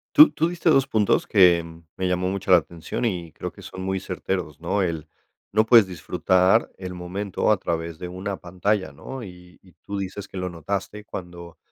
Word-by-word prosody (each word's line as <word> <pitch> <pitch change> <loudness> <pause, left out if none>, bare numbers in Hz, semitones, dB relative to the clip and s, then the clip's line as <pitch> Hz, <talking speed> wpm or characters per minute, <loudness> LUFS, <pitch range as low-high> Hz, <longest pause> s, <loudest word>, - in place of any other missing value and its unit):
Tú 305 +1 +10
tú 165 - +1
diste 175 -1 0
2 135 -4 +4
puntos 110 -6 +2
que 90 -4 +5 0.3
me 95 - -1
llamó 90 0 0
mucho 95 0 -2
la 90 - +9
atención 85 +6 -4
y 90 -7 -2
creo - - -6
que - - -15
son 95 - -8
muy 95 0 -1
certeros, 90 -4 -4
¿no? 85 +5 0
El, 80 -4 -2 0.4
no 110 +2 +3
puedes 115 -3 +7
disfrutar 95 +4 +2
el 90 -1 -6
momento 90 +4 -1
a 105 - +4
través 85 -2 -3
de 90 - -5
una 95 +2 -5
pantalla, 95 +3 -1
¿no? 130 -2 -8
Y 90 -2 -13
y 90 -2 -21
tú 100 - -4
dices 100 +1 -5
que - - -9
lo 90 0 -2
notaste 100 +5 -4
cuando 85 -3 -9
95 Hz, 195 wpm, -24 LUFS, 90-100 Hz, 0.4 s, Tú